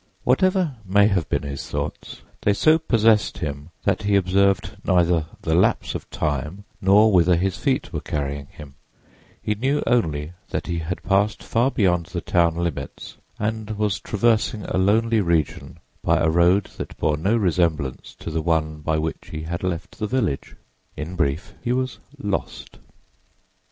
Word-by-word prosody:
Whatever 185 -7 +2
may 100 +2 +4
have 95 -6 0
been - - 0
his 70 -1 -6
thoughts, - - -5 0.2
they 105 - +3
so 155 +9 +4
possessed 110 -7 +3
him 75 -1 -5
that 100 0 +1
he 105 -1 +1
observed 100 +1 +2
neither 85 -3 +2 0.2
the - - 0
lapse - - +2
of - - -6
time 75 +5 -3 0.2
nor 105 +3 +5
whither 90 -2 +5
his 95 +2 0
feet - - -1
were - - -2
carrying 70 -1 -3
him; 75 -2 -12 0.7
he 105 - +1
knew 135 +7 0
only 80 -9 0 0.2
that - - -3
he 85 -1 -2
had 85 +3 -4
passed 100 +2 +1
far 120 +3 +2
beyond 90 -8 +1
the 90 - -4
town 85 -1 +2
limits 85 -3 -4 0.2
and 110 0 -3
was 105 -5 0
traversing 110 0 +1
a - - -3
lonely 110 +3 +3
region 85 -5 -1 0.3
by - - +3
a 80 - +2
road 85 +4 +4
that - - -7
bore 75 - +1
no 95 +10 +1
resemblance 85 - 0
to 80 - -7
the 80 +1 -1
one 80 -1 0
by 80 +1 -1
which 80 +1 -3
he 80 0 -5
had 85 +2 -4
left 90 -3 -4
the 105 - -1
village. 110 - -1 0.4
In 80 +4 -5
brief, 80 +1 -1
he 120 - -1
was 130 0 -1 0.2
"lost." 100 -7 -4
90 Hz, 165 wpm, -23 LUFS, 80-105 Hz, 0.7 s, nor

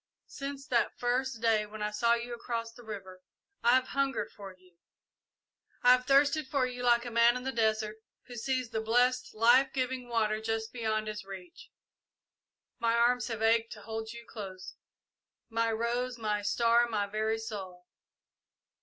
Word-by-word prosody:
Since 275 0 -7
that 240 -3 +1
first 245 -1 -1
day, 220 -2 +3
when 210 0 -7
I 210 - -1
saw 235 +3 +3
you 240 +1 -5
across 230 -1 -4
the 240 - -14
river, 190 -4 -8 0.4
I 240 +2 +5
have 260 0 +1
hungered 275 -1 -1
for 200 -2 -10
you; 185 0 -21
yes, - - -45
I 245 - +8
have 250 0 +4
thirsted 280 +1 +4
for 270 -2 +1
you 250 -1 -5
like 240 0 +3
a 240 - -5
man 235 +1 +5
in 250 - -7
the 265 - -2
desert 220 -2 0 0.3
who 245 - -10
sees 255 0 -2
the 220 -1 -1
blessed, 245 +3 +1
life 245 +4 +5
giving 255 -1 -2
water 215 -2 0
just 225 0 -3
beyond 220 -3 -1
his 215 -1 -5
reach. 190 -3 -11 1.1
My 230 0 +2
arms 245 +1 +3
have 225 -2 -4
ached 225 0 +3
to 210 - -12
hold 220 0 -5
you 235 0 -10
close 190 -3 -8 0.8
my 230 0 +1
rose, 240 +2 -1
my 210 -2 -1
star, 235 +3 +3
my 210 -3 0
very 215 +2 -1
soul!" 190 -5 -7
230 Hz, 170 wpm, -30 LUFS, 215-245 Hz, 1.1 s, I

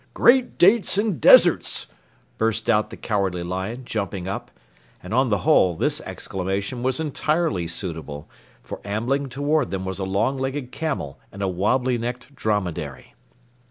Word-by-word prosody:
"Great 250 0 +4
dates 200 +2 +5
and 205 -5 0
deserts!" - - +6 0.5
burst 115 +1 +1
out 105 -1 +2
the - - -10
Cowardly 95 -5 -1
Lion, 95 +8 -4
jumping 100 -5 -3
up. 100 - -5 0.5
And 90 - -6
on 130 +1 +3
the 105 - +2
whole, 95 - +4
this - - 0
exclamation 95 +6 -4
was 130 +2 +1
entirely 150 - 0
suitable, 80 -4 -5 0.4
for - - -8
ambling 125 +7 -1
toward 145 +1 0
them 95 -1 -4
were 95 - -3
a - - -2
long 100 +8 0
legged 135 -1 -3
camel 140 - -4
and 100 0 -6
a - - +1
wobbly 120 +7 +1
necked 125 +4 -5
dromedary. 90 - -3
110 Hz, 150 wpm, -23 LUFS, 95-135 Hz, 0.5 s, deserts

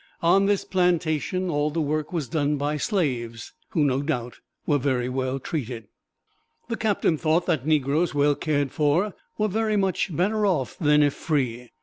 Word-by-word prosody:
On 195 +4 +4
this 205 -1 +1
plantation 180 0 0
all 145 0 +1
the 160 +2 -3
work 155 0 -1
was 165 -7 -2
done 150 -2 0
by 145 +2 -1
slaves, 125 - -2 0.2
who, 155 - +1
no 135 -1 +1
doubt, 125 -6 -3 0.3
were 145 -1 +2
very 130 -2 0
well 130 +1 -2
treated. 120 -7 -5 0.8
The 230 - -1
captain 205 -8 +1
thought 160 +2 +2
that 145 -2 0
negroes 155 +2 +1
well 145 0 +4
cared 145 -3 -1
for 160 +7 +1 0.2
were 215 - +1
very 215 +1 0
much 195 -2 0
better 210 +5 +1
off 165 -11 0
than 150 -2 +4
if 145 -1 +2
free. 125 -6 -2
150 Hz, 165 wpm, -25 LUFS, 135-180 Hz, 0.8 s, On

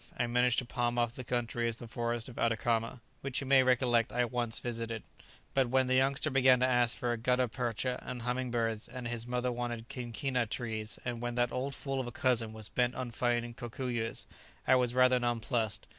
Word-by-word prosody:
I 120 - +1
managed 125 0 +2
to 125 - +1
palm 120 0 -1
off 120 -1 +1
the 130 - -6
country 120 -1 -1
as 115 - -4
the 120 - -8
forest 120 0 -2
of 125 - -9
Atacama, 115 +1 0 0.2
which 135 -1 -1
you 135 - -4
may 135 0 +6
recollect 125 -2 +3
I 125 0 +2
once 120 -1 -1
visited; 115 -2 -4 0.5
but 135 -3 +2
when 130 +1 +3
the 130 - +1
youngster 135 +3 +2
began 130 -1 +5
to - - +5
ask 125 -1 +2
for 120 -3 0
gutta 125 +2 +2
percha 125 +1 -2
and 125 -2 -6
humming 125 +1 -1
birds, 115 -2 -1
and 125 -1 -6
his 120 0 -4
mother 125 0 0
wanted 120 -1 -4
quinquina 125 0 -2
trees, 110 -3 -3
and 120 -1 -3
when 120 0 -2
that 120 0 +2
old 135 +2 -2
fool 135 -1 -3
of 130 - -2
a - - -5
cousin 120 -3 +1
was 110 -1 -7
bent 125 0 +1
on 125 -2 -4
finding 120 0 0
cocuyos, 120 -1 -3 0.4
I 130 - +5
was 125 -1 +3
rather 130 0 +5
nonplussed. 120 -2 -1
120 Hz, 205 wpm, -32 LUFS, 115-125 Hz, 0.5 s, may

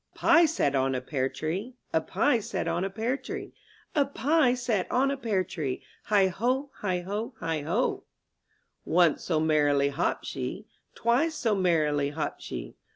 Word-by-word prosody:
A - - -21
PIE 335 0 +6
sat 145 - +1
on 135 -1 +1
a - - 0
pear 130 0 -1
tree, 165 +8 -3 0.3
^ - - +4
^ - - -7
A - - -15
pie 275 -4 +2
sat 200 - -3
on 170 +2 0
a 195 - -1
pear 225 +6 -1
tree, - - -7 0.4
A 295 -4 +4
pie 280 -1 +2
sat 235 -6 -1
on 270 +2 +2
a - - 0
pear 220 -8 0
tree, 155 -8 -4 0.2
Heigh 195 -3 +3
O, 265 +4 +1
heigh 180 -3 -1
O, 220 +5 -3
heigh 160 -2 -2
0! 145 - 0 0.8
Once 170 -2 +3
so 160 -3 +1
merrily 145 -3 +3
hopped 140 - -1
she, - - -4 0.3
Twice 275 +8 +2
so 240 -8 +1
merrily 155 -7 +2
hopped 150 +2 -4
she. - - -6
190 Hz, 180 wpm, -28 LUFS, 155-250 Hz, 0.8 s, PIE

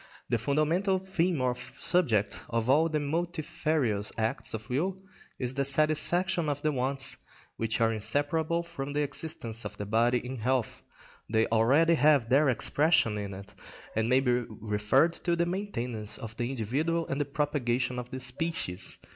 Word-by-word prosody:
The 120 - +1
fundamental 155 - +1
theme 185 -4 0
or 125 -1 +2
subject 130 - 0
of 115 +2 +1
all 160 +4 +4
the 155 -1 0
multifarious 150 - -1
acts 110 0 -1
of 110 0 -8
will 175 +10 -1 0.4
is 125 -1 -2
the 140 +1 0
satisfaction 155 +4 +3
of 145 0 -3
the 155 - +2
wants 135 0 -1 0.4
which 115 0 -1
are 115 0 +3
inseparable 155 +9 +1
from 145 -5 -6
the 150 - +1
existence 120 -6 -4
of 105 0 -7
the 105 - -4
body 115 +4 +2
in 125 +2 -5
health, 125 +1 -1 0.5
they 110 0 +3
already 135 +9 +4
have 145 -7 +4
their 140 +2 +4
expression 130 -4 +2
in 100 -1 -5
it, 100 +1 -11 0.4
and 110 +1 +1
may 130 +1 +4
be 125 -2 +1 0.2
referred 110 +9 +1
to 170 -1 +2
the 170 0 +1
maintenance 125 - -4
of 115 -1 -8
the 120 0 -1
individual 140 +8 -1
and 135 +2 -1
the - - 0
propagation 130 -4 -1
of 125 0 -7
the 130 0 -5
species. 125 - -2
135 Hz, 165 wpm, -29 LUFS, 115-160 Hz, 0.5 s, all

